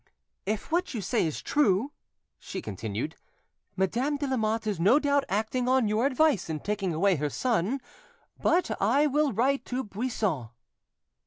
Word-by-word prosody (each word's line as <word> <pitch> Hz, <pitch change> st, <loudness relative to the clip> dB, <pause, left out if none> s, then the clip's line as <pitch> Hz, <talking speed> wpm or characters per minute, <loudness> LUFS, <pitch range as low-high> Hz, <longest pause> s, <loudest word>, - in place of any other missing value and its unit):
"If 215 Hz, +7 st, -2 dB
what 345 Hz, -5 st, 0 dB
you 220 Hz, -, -2 dB
say 200 Hz, -1 st, +1 dB
is 155 Hz, -, -5 dB
true," 260 Hz, -2 st, +2 dB, 0.5 s
she 190 Hz, -, -6 dB
continued, 110 Hz, -, -4 dB, 0.6 s
"Madame 240 Hz, +10 st, 0 dB
de 285 Hz, -, -2 dB
Lamotte 225 Hz, -4 st, 0 dB
is 205 Hz, -5 st, -2 dB
no 200 Hz, +11 st, +5 dB
doubt 285 Hz, -2 st, +2 dB
acting 220 Hz, +6 st, 0 dB
on 260 Hz, -3 st, +3 dB
your 215 Hz, +5 st, +2 dB
advice 280 Hz, -, +2 dB
in 155 Hz, -1 st, -2 dB
taking 200 Hz, -3 st, -1 dB
away 180 Hz, +3 st, +2 dB
her 150 Hz, +1 st, -1 dB
son. 235 Hz, -, 0 dB, 0.6 s
But 355 Hz, -9 st, +2 dB
I 265 Hz, +9 st, +4 dB
will 295 Hz, 0 st, +2 dB
write 255 Hz, +4 st, +1 dB
to 255 Hz, +1 st, -2 dB
Buisson." 205 Hz, -, -2 dB
225 Hz, 155 wpm, -28 LUFS, 190-270 Hz, 0.6 s, no